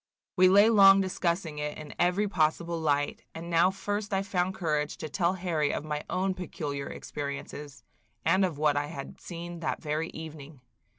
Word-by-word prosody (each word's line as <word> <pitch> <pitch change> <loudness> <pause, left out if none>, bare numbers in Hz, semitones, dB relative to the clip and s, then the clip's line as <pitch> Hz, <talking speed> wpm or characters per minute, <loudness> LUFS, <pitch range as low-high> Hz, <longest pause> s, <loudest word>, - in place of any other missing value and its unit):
We 185 -1 +6
lay 200 +3 +7
long 195 -2 +8
discussing 170 -4 -1
it 150 0 -3
in 155 -1 -9
every 180 +4 +2
possible 170 -1 0
light, 145 -2 0
and 170 +1 -6
now 170 +2 +5
first 205 +1 -3
I 195 - +1
found 190 -2 -1
courage 150 -4 -1
to 155 - -6
tell 175 +1 +1
Harry 170 -5 0
of - - -3
my 150 -1 -3
own 190 +1 0
peculiar 145 -6 -5
experiences, 145 0 -6 0.4
and 190 +1 +4
of 175 -6 0
what 150 -1 +2
I 145 0 0
had 140 -3 -8
seen 170 0 -7
that 160 - -2
very 155 +2 -2
evening. 155 -3 -9
165 Hz, 175 wpm, -29 LUFS, 150-185 Hz, 0.4 s, long